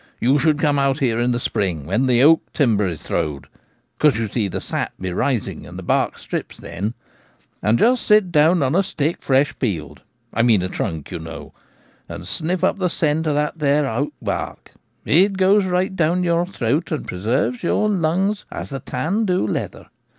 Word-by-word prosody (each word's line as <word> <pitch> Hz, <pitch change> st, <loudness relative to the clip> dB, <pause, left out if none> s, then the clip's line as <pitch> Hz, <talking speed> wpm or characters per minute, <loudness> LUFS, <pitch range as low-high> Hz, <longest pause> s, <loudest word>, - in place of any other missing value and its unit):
You 135 Hz, +5 st, +3 dB
should 155 Hz, +1 st, +2 dB
come 145 Hz, -2 st, +2 dB
out 140 Hz, -1 st, +2 dB
here 120 Hz, -5 st, 0 dB
in 120 Hz, +1 st, +1 dB
the 120 Hz, -, 0 dB
spring, 95 Hz, -, -2 dB
when 110 Hz, -, +1 dB
the 125 Hz, 0 st, +4 dB
oak 160 Hz, +2 st, +4 dB
timber 110 Hz, -8 st, +2 dB
is 85 Hz, -4 st, -5 dB
throwed 75 Hz, -2 st, -2 dB, 0.5 s
(because, 150 Hz, -7 st, +3 dB
you 115 Hz, -1 st, -1 dB
see, 105 Hz, 0 st, -1 dB
the 95 Hz, -, -4 dB
sap -, -, -3 dB
be 95 Hz, -1 st, -4 dB
rising, 120 Hz, +1 st, -2 dB
and -, -, -10 dB
the -, -, -7 dB
bark -, -, 0 dB
strips -, -, -5 dB
then), 100 Hz, +8 st, -5 dB, 0.7 s
and 110 Hz, +2 st, +2 dB
just 245 Hz, -, +3 dB
sit 210 Hz, -4 st, +4 dB
down 160 Hz, +1 st, +4 dB
on 130 Hz, +2 st, +1 dB
a 190 Hz, -, +4 dB
stick 160 Hz, -3 st, -2 dB
fresh 135 Hz, +1 st, +2 dB
peeled 75 Hz, -, -3 dB, 0.2 s
— -, -, -43 dB
I 115 Hz, -, +1 dB
means 115 Hz, -6 st, +4 dB
a 90 Hz, -, -2 dB
trunk, 80 Hz, -5 st, -4 dB
you -, -, -4 dB
know 80 Hz, 0 st, -9 dB, 0.3 s
— -, -, -34 dB
and -, -, -7 dB
sniff 175 Hz, +3 st, -2 dB
up 190 Hz, -, +2 dB
the 185 Hz, -1 st, +1 dB
scent 160 Hz, -1 st, 0 dB
of 150 Hz, -, +1 dB
that 150 Hz, +2 st, -1 dB
there 145 Hz, -1 st, +2 dB
oak 135 Hz, +5 st, -2 dB
bark. -, -, -4 dB, 0.3 s
It 190 Hz, +6 st, +4 dB
goes 195 Hz, +1 st, +4 dB
right 185 Hz, +1 st, 0 dB
down 175 Hz, +1 st, +1 dB
your 170 Hz, 0 st, +1 dB
throat, 145 Hz, -1 st, -1 dB
and 155 Hz, -, -2 dB
pre 90 Hz, -, -6 dB
serves 135 Hz, -, 0 dB
your 215 Hz, -, +1 dB
lungs 195 Hz, +2 st, 0 dB
as -, -, -6 dB
the 135 Hz, -, -4 dB
tan 165 Hz, -, -1 dB
do 180 Hz, -, +1 dB
leather. 105 Hz, -, -4 dB
145 Hz, 205 wpm, -21 LUFS, 115-175 Hz, 0.7 s, the